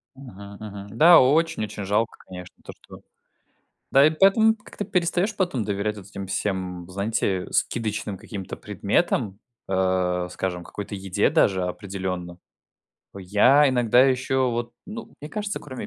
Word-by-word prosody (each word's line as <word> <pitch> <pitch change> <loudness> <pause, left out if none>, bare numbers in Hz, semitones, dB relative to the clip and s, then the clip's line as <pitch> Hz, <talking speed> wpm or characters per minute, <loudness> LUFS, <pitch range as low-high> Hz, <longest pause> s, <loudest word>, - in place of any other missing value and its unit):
Мгм, 100 -7 -11
мгм. 100 0 -9
Да, 170 +3 +8
очень-очень 130 -8 +1
жалко, 105 +4 0
конечно, 90 -1 -10
то - - -9
что - - -14 0.9
да, 135 +2 +6
и - - +4
поэтому 195 +7 +4
как-то 205 -1 -8
перестаешь 180 +4 0
потом 175 - -1
доверять 105 +1 -2
вот 95 - -10
этим 100 -1 -7
всем 95 -3 -3
знаете 100 -1 -1
скидочным 105 -3 -1
каким-то 95 -1 -7
предметам, 100 -1 -1 0.3
э, 95 -1 0
скажем 90 -2 -4
какой-то 100 +3 -7
еде, 95 -1 0
даже, 95 -2 +2
определенно. 90 -2 -5 0.8
Я 125 +10 +4
иногда 125 -1 +4
еще 130 -1 +1
вот, 120 0 -3
ну, 220 +2 -8
мне 150 - -7
кажется 205 -2 -3
кроме 130 -3 -7
105 Hz, 135 wpm, -24 LUFS, 95-135 Hz, 0.9 s, Да